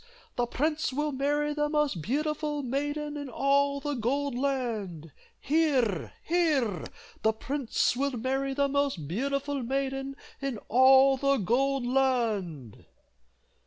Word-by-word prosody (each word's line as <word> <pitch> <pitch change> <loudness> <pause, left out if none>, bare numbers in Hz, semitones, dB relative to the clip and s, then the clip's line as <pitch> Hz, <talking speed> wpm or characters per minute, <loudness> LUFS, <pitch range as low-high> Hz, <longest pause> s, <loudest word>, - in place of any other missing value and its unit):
the 245 0 0
prince 305 +5 -1
will 295 +3 -1
marry 290 +2 0
the 295 0 0
most 295 - 0
beautiful 300 - -1
maiden 290 +3 -2
in 285 -2 -5
all 280 +2 +2
the 290 +1 -3
Gold 270 +2 -1
Land. 225 - -2 0.3
Hear! 270 - +1
hear! 295 - +1 0.4
the 220 0 +3
prince 270 +1 -1
will 280 +2 -1
marry 270 +3 -1
the 280 0 +2
most 275 - -1
beautiful 275 - -2
maiden 270 +2 -2 0.3
in 275 -4 -2
all 265 +2 +6
the 275 +1 +2
Gold 260 +5 +1
Land!" 225 - -1
275 Hz, 125 wpm, -28 LUFS, 245-285 Hz, 0.4 s, all